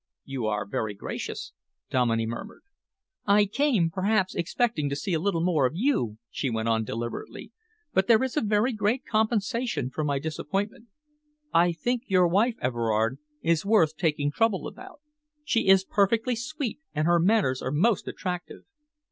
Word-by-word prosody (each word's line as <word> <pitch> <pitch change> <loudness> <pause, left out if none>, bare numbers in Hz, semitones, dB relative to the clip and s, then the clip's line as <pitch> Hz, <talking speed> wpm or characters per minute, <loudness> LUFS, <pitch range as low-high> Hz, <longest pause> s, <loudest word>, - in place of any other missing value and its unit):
"You 130 -5 -3
are 105 -1 -1
very 105 +1 -3
gracious," 100 - -6 0.4
Dominey 115 -3 +2
murmured. 120 - -7 0.6
"I 205 +1 +5
came, 210 - +1
perhaps, 190 +1 +1
expecting 170 -4 0
to 140 - -2
see 175 +6 -3
a 160 - +2
little 170 -2 0
more 160 -7 +3
of 130 - -7
you," 175 - 0
she 135 - -2
went 110 -1 -2
on 115 -1 +2
deliberately, 115 +2 -6 0.4
"but 190 0 +2
there 230 +1 +5
is 260 - -2
a 300 - +2
very 215 +4 +1
great 215 +4 0
compensation 220 - 0
for 155 - -3
my 145 -2 0
disappointment. 195 - -3 0.7
I 175 +1 +5
think 240 - -2
your 185 -3 +4
wife, 215 +7 +2
Everard, 115 0 0 0.2
is 165 -1 +2
worth 195 -7 +3
taking 150 -3 0
trouble 215 +3 +1
about. 375 -6 -12 0.4
She 230 -8 0
is 190 0 +6
perfectly 225 +6 +2
sweet, 275 0 -4 0.2
and 155 +1 +1
her 170 0 +4
manners 175 -8 +2
are - - -2
most 190 +8 +2
attractive." 180 -2 -5
180 Hz, 160 wpm, -27 LUFS, 140-220 Hz, 0.7 s, is